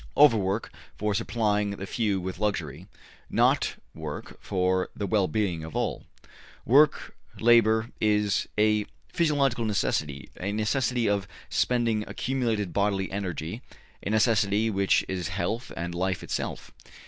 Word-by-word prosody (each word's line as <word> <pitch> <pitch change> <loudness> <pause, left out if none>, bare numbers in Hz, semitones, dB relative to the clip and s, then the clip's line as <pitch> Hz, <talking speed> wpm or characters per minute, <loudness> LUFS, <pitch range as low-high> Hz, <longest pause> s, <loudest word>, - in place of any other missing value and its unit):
Overwork 110 -7 +4 0.3
for 105 0 0
supplying 105 -1 0
the 100 -1 -5
few 105 -2 0
with 90 0 -5
luxury 90 -6 -2 0.4
not - - +2 0.2
work 75 -2 -7
for 95 -1 0
the 100 - -3
well 100 -1 +2
being 90 -3 -1
of 80 -1 -8
all. - - -2 0.6
Work, 140 +5 +4 0.2
labor, 115 -1 +4
is 105 -2 +2
a 105 0 +3 0.3
physiological 140 -7 +2
necessity, 75 -9 -1
a 100 +3 -2
necessity 115 +2 +1
of 100 -1 0 0.2
spending 115 -3 +1
accumulated 115 -7 -1
bodily 100 -1 0
energy, 95 +1 -4 0.4
a - - -4
necessity 110 -1 +2
which 100 -1 +2
is 90 -3 -3
health 100 +7 -3
and 85 +1 -3
life 95 +1 -1
itself. - - -4
105 Hz, 125 wpm, -27 LUFS, 95-115 Hz, 0.6 s, Overwork